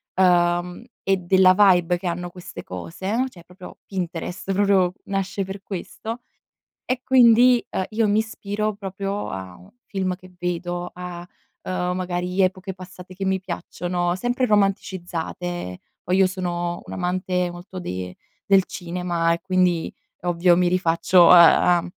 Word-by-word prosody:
uhm, 175 Hz, +1 st, +2 dB, 0.2 s
e 195 Hz, 0 st, +2 dB
della 185 Hz, +1 st, +5 dB
vibe 180 Hz, -3 st, +4 dB
che 180 Hz, +1 st, -5 dB
hanno 175 Hz, +1 st, -3 dB
queste 180 Hz, 0 st, -10 dB
cose, 185 Hz, -, -3 dB
cioè 175 Hz, -8 st, -16 dB
proprio 180 Hz, +1 st, -13 dB
Pinterest 180 Hz, 0 st, -4 dB
proprio 195 Hz, -2 st, +3 dB
nasce 195 Hz, 0 st, -2 dB
per 195 Hz, +1 st, -7 dB
questo. 220 Hz, +5 st, -6 dB, 0.6 s
E 255 Hz, 0 st, -2 dB
quindi, 245 Hz, -1 st, +5 dB
ehm, 190 Hz, -, -2 dB
io 220 Hz, 0 st, +1 dB
mi 210 Hz, +1 st, +3 dB
ispiro 215 Hz, -1 st, -3 dB
proprio 195 Hz, 0 st, -4 dB
a 95 Hz, -1 st, -7 dB
un 195 Hz, -, -17 dB, 0.2 s
film 185 Hz, -2 st, -2 dB
che 185 Hz, 0 st, -16 dB
vedo, 175 Hz, 0 st, -3 dB
a, 180 Hz, -1 st, -7 dB, 0.4 s
uhm, 180 Hz, -1 st, -2 dB
magari 180 Hz, +1 st, -1 dB
epoche 185 Hz, +1 st, 0 dB
passate 185 Hz, 0 st, -12 dB
che 195 Hz, +1 st, -4 dB
mi 190 Hz, 0 st, +1 dB
piacciono, 175 Hz, 0 st, -3 dB
sempre 245 Hz, +6 st, 0 dB
romanticizzate. 175 Hz, -, -2 dB, 0.2 s
Poi 180 Hz, -, 0 dB
io 190 Hz, -1 st, +5 dB
sono 175 Hz, -2 st, -3 dB
un -, -, -8 dB
amante 180 Hz, 0 st, -1 dB
molto 180 Hz, +2 st, -9 dB
de 90 Hz, -, -5 dB, 0.3 s
del 195 Hz, -2 st, +5 dB
cinema 175 Hz, -1 st, -2 dB
e 170 Hz, -, -4 dB
quindi 180 Hz, -3 st, +1 dB, 0.2 s
è 180 Hz, -, -14 dB
ovvio 175 Hz, 0 st, +3 dB
mi 180 Hz, 0 st, +3 dB
rifaccio 175 Hz, 0 st, +4 dB
a 175 Hz, 0 st, +7 dB
a 170 Hz, -, -2 dB
180 Hz, 145 wpm, -23 LUFS, 175-195 Hz, 0.6 s, a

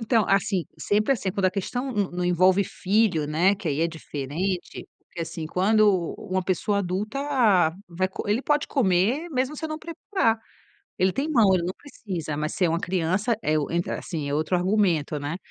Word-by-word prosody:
Então, 225 Hz, -2 st, +2 dB
assim 195 Hz, -2 st, +2 dB
sempre 215 Hz, +6 st, +2 dB
assim, 200 Hz, -7 st, -2 dB
quando 200 Hz, 0 st, -2 dB
a -, -, +2 dB
questão 245 Hz, +7 st, -3 dB
não 205 Hz, -3 st, 0 dB
não 180 Hz, 0 st, -3 dB
envolve 185 Hz, +2 st, +4 dB
filho, 195 Hz, -6 st, +1 dB
né, 175 Hz, +6 st, +3 dB
que 190 Hz, -4 st, -5 dB
aí 145 Hz, +2 st, -1 dB
é 165 Hz, -, +3 dB
diferente. 165 Hz, +3 st, -4 dB, 0.2 s
Porque 170 Hz, -, -9 dB
assim, 160 Hz, -1 st, -5 dB
quando 210 Hz, +5 st, +3 dB
u 175 Hz, -3 st, -1 dB, 0.2 s
uma 185 Hz, 0 st, +1 dB
pessoa 195 Hz, +3 st, 0 dB
adulta 200 Hz, +7 st, -2 dB, 0.7 s
vai 185 Hz, +2 st, -1 dB
co 190 Hz, -, -6 dB
ele 215 Hz, +5 st, +2 dB
pode 295 Hz, -1 st, +1 dB
comer, 235 Hz, -, +1 dB
mesmo 265 Hz, +2 st, -1 dB
se 320 Hz, -, -6 dB
eu -, -, -2 dB
não 310 Hz, 0 st, -4 dB
preparar. 325 Hz, -, -1 dB, 0.6 s
Ele 185 Hz, 0 st, +2 dB
tem 285 Hz, +4 st, -1 dB
mão, 220 Hz, -9 st, +5 dB
ele 180 Hz, -, +2 dB
não 180 Hz, +2 st, -2 dB
precisa. 180 Hz, -, -6 dB
Mas 155 Hz, +1 st, -2 dB
se 185 Hz, -, +2 dB
é -, -, +2 dB
uma 165 Hz, +1 st, 0 dB
criança, 185 Hz, +6 st, 0 dB
é 155 Hz, 0 st, +1 dB
o 150 Hz, 0 st, -2 dB
entra 170 Hz, +1 st, -1 dB
assim, 155 Hz, -5 st, -4 dB
é -, -, -2 dB
outro 155 Hz, +4 st, +1 dB
argumento, 175 Hz, -6 st, +1 dB
né. 145 Hz, +5 st, -4 dB
190 Hz, 200 wpm, -25 LUFS, 170-215 Hz, 0.7 s, mão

